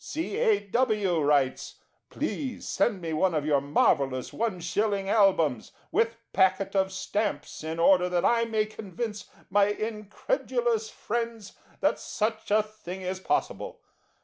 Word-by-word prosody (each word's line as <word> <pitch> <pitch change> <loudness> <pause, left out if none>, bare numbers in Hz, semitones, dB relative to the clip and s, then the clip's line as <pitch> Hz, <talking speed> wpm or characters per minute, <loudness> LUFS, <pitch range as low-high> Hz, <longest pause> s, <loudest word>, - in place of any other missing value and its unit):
C. 320 +6 -4
A. 450 -3 +4
W. 210 -5 +1
writes: 145 -3 +1 0.3
"Please 265 -5 -4
send 205 -6 +1
me 165 -2 -3
one 170 +2 +2
of 150 -1 0
your 145 -2 +3
marvellous 135 -2 +1
1/ 200 -1 -1
Albums, 185 - +2 0.2
with 230 0 +2 0.2
packet 190 +1 +2
of 190 0 +2
stamps, 205 -2 -3
in 160 +1 -4
order 180 +1 +4
that 175 -1 +1
I 230 -1 +3
may 220 -2 0
convince 215 0 -6 0.2
my 200 +1 +5
incredulous 220 - -1
friends 230 -2 -4 0.3
that - - +2
such 220 +1 -2
a 210 +1 +4
thing 190 -3 -9
is 185 +1 -3
possible." - - -2
200 Hz, 135 wpm, -27 LUFS, 180-225 Hz, 0.3 s, my